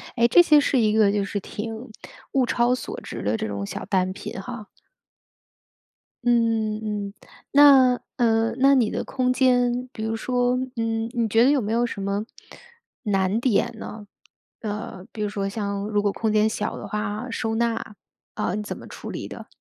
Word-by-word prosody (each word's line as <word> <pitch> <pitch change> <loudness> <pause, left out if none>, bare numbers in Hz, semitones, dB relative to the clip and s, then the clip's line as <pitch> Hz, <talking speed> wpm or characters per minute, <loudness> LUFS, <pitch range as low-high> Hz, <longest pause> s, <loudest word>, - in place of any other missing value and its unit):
哎， 235 -1 +4
这 295 +9 +7
些 305 -3 +6
是 280 -2 +2
一 215 -2 +3
个 215 -2 +4
就 205 -1 0
是 205 +1 -3
挺 210 +3 -6 0.6
物 260 -2 +2
超 240 +1 +2
所 255 - -5
值 - - -7
的 105 +3 0
这 - - -3
种 100 -1 -4
小 100 - -5
单 185 -1 +1
品 190 - -7
哈。 220 0 -8 1.6
嗯 225 -3 +2
嗯。 205 -2 -4 0.4
那 270 -3 +7 0.2
呃， 225 -1 +2
那 275 +1 +5
你 240 -5 +3
的 - - -3
空 255 -2 0
间， 250 -1 +2
比 220 - -6
如 220 0 -1
说， 245 +1 0 0.2
嗯， 225 0 -1
你 235 -2 +1
觉 225 +2 +4
得 265 - +5
有 290 - +3
没 220 -2 -2
有 240 +1 +2
什 215 -4 -5
么 200 +2 -2 0.8
难 195 0 +1
点 240 -1 +1
呢？ 210 -1 -8 0.5
呃， 210 -3 -5
比 215 - -7
如 210 - +1
说 200 -1 -2
像 200 -1 -3
如 210 -1 +1
果 205 -1 0
空 220 -1 -1
间 215 0 +3
小 215 -1 -3
的 - - -7
话， 210 +2 -3
收 225 -1 -2
纳， 230 -2 -1 0.4
呃， 180 - -1
你 210 - -3
怎 205 - -6
么 - - -11
处 - - -9
理 - - -5
的？ - - -9
225 Hz, 200 characters per minute, -24 LUFS, 205-245 Hz, 1.6 s, 这